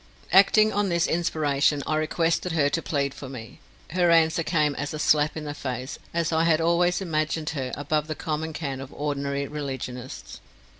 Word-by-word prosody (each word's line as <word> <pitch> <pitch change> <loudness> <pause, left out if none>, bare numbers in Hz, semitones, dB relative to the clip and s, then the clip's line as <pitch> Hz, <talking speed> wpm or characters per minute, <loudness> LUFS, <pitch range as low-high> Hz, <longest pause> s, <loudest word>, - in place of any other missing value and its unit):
Acting 215 +3 +6
on 205 0 +1
this 170 -1 +2
inspiration, 150 -4 +1
I 155 - 0
requested 165 +2 0
her 145 -3 +3
to 165 +4 -1
plead 140 -4 -1
for 135 - -9
me. 115 -4 -9 0.3
Her 175 0 +2
answer 165 0 +4
came 155 -3 +1
as 145 +2 -4
a - - -4
slap 150 0 +2
in 155 - -5
the 145 -1 -4
face, 130 -1 -5
as 170 -1 0
I 160 0 +2
had 165 -1 +3
always 175 +2 +2
imagined 155 -2 -1
her 130 -4 -3
above 150 +1 -1
the 155 - -3
common 160 0 -3
cant 140 -4 -4
of 135 - -9
ordinary 140 -1 -2
religionists. 130 -4 -6
155 Hz, 185 wpm, -25 LUFS, 140-165 Hz, 0.3 s, Acting